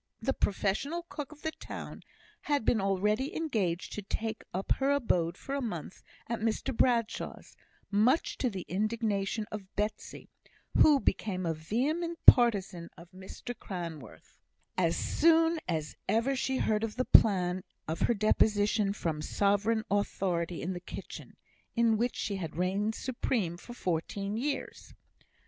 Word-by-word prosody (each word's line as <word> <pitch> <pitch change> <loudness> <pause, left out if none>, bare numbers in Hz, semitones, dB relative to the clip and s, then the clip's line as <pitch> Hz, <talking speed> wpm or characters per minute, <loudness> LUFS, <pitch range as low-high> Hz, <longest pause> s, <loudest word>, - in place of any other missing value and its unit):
The 270 - 0
professional 215 - -1
cook 295 -1 -6
of 300 -1 -15
the 315 - -1
town - - -8 0.4
had 285 -6 0
been 220 - +3
already 210 +7 0
engaged 210 - -1
to 210 - -4
take 220 +2 -4
up 190 +2 -4
her 270 +1 +2
abode 180 -11 +1
for 275 - -6
a 280 - -1
month 185 - -5 0.2
at 235 0 -3
Mr 225 +3 -1
Bradshaw's, 230 -2 0 0.4
much 230 +10 +3
to 255 - +1
the 190 -5 -6
indignation 210 +1 -1
of 200 -3 -8
Betsy, 210 +1 -3 0.5
who 295 -3 +6
became 185 -7 -1
a 165 - +1
vehement 285 - -1
partisan 195 -8 +6
of 170 0 -14
Mr 190 +6 -8
Cranworth, 170 - -8 0.4
as 170 -3 +1
soon 330 +1 +3
as 155 -3 -2
ever 230 +6 +2
she 265 0 0
heard 215 -2 +1
of 225 -1 -3
the 255 +1 0
plan 185 -3 +5 0.2
of 160 +1 -3
her 240 - +2
deposition 210 -1 +2
from 160 -6 -2
sovereign 205 +6 +1
authority 180 -4 -1
in 185 +3 -2
the 175 - -5
kitchen, 175 - -9 0.4
in 230 -2 +4
which 235 +3 0
she 200 -2 -2
had 165 -5 -5
reigned 195 +5 0
supreme 235 -8 -1
for 240 +7 -11
fourteen 195 +3 -2
years. 275 +5 -4
210 Hz, 145 wpm, -30 LUFS, 185-245 Hz, 0.5 s, who